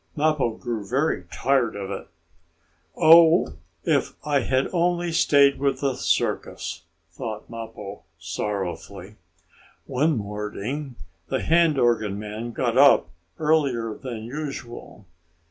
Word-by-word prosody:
Mappo 150 Hz, -6 st, +1 dB
grew 115 Hz, -3 st, -4 dB
very 130 Hz, -, -1 dB
tired 130 Hz, -3 st, +1 dB
of 100 Hz, -1 st, -5 dB
it. -, -, -6 dB, 0.9 s
"Oh, 165 Hz, -, +6 dB, 0.3 s
if -, -, +1 dB
I 145 Hz, -2 st, +2 dB
had 130 Hz, +1 st, +1 dB
only 175 Hz, 0 st, +1 dB
stayed 140 Hz, -3 st, +4 dB
with 135 Hz, -1 st, 0 dB
the 140 Hz, -2 st, +1 dB
circus," -, -, -2 dB, 0.3 s
thought 110 Hz, -1 st, -6 dB
Mappo, 110 Hz, -3 st, -8 dB, 0.2 s
sorrowfully. 90 Hz, +1 st, -5 dB, 0.7 s
One 150 Hz, +3 st, +1 dB
morning 105 Hz, +6 st, -5 dB, 0.3 s
the -, -, -2 dB
hand 165 Hz, -2 st, +3 dB
organ 115 Hz, -5 st, +1 dB
man 105 Hz, +3 st, -6 dB
got 120 Hz, +1 st, 0 dB
up 140 Hz, -11 st, +6 dB, 0.3 s
earlier 140 Hz, -8 st, +1 dB
than 115 Hz, -2 st, -7 dB
usual. 125 Hz, -5 st, -7 dB
125 Hz, 110 wpm, -24 LUFS, 105-145 Hz, 0.9 s, Oh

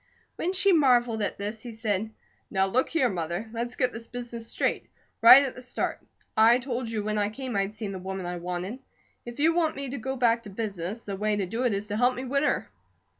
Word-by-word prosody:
When 355 Hz, -, -1 dB
she 385 Hz, +1 st, +3 dB
marvelled 245 Hz, -7 st, +3 dB
at 200 Hz, -, -2 dB
this 210 Hz, +2 st, -4 dB
he 240 Hz, -1 st, -8 dB
said: 220 Hz, -2 st, -1 dB, 0.4 s
"Now, 190 Hz, -1 st, +2 dB
look 240 Hz, +7 st, +1 dB
here, 320 Hz, -6 st, +2 dB
Mother, 175 Hz, +2 st, -3 dB
let's 240 Hz, +1 st, -3 dB
get 255 Hz, -2 st, +1 dB
this 230 Hz, +1 st, -8 dB
business 235 Hz, -2 st, -5 dB
straight, -, -, -1 dB, 0.3 s
right 255 Hz, +4 st, +10 dB
at 270 Hz, -, -3 dB
the 255 Hz, -, -10 dB
start. 250 Hz, -1 st, -2 dB, 0.4 s
I 225 Hz, +2 st, +6 dB
told 250 Hz, -2 st, -3 dB
you 220 Hz, -2 st, -2 dB
when 215 Hz, 0 st, -1 dB
I 205 Hz, 0 st, +1 dB
came 255 Hz, +1 st, -6 dB
I'd 195 Hz, 0 st, 0 dB
seen 215 Hz, -1 st, -5 dB
the 190 Hz, -, -5 dB
woman 190 Hz, 0 st, -5 dB
I 175 Hz, 0 st, -3 dB
wanted. 180 Hz, +7 st, -4 dB, 0.5 s
If 240 Hz, +3 st, -8 dB
you 320 Hz, +3 st, +4 dB
want 330 Hz, -2 st, +1 dB
me 275 Hz, -1 st, -5 dB
to 280 Hz, -, -4 dB
go 265 Hz, +4 st, -3 dB
back 235 Hz, -2 st, +2 dB
to 210 Hz, -, -10 dB
business, 200 Hz, 0 st, -4 dB
the 200 Hz, -, -4 dB
way 210 Hz, +2 st, 0 dB
to 200 Hz, -2 st, -1 dB
do 230 Hz, +7 st, -2 dB
it 240 Hz, -, +2 dB
is 200 Hz, +1 st, -3 dB
to 205 Hz, -, -2 dB
help 245 Hz, +2 st, +3 dB
me 255 Hz, -, -5 dB
win 275 Hz, +2 st, +1 dB
her." -, -, 0 dB
230 Hz, 235 wpm, -27 LUFS, 205-250 Hz, 0.5 s, right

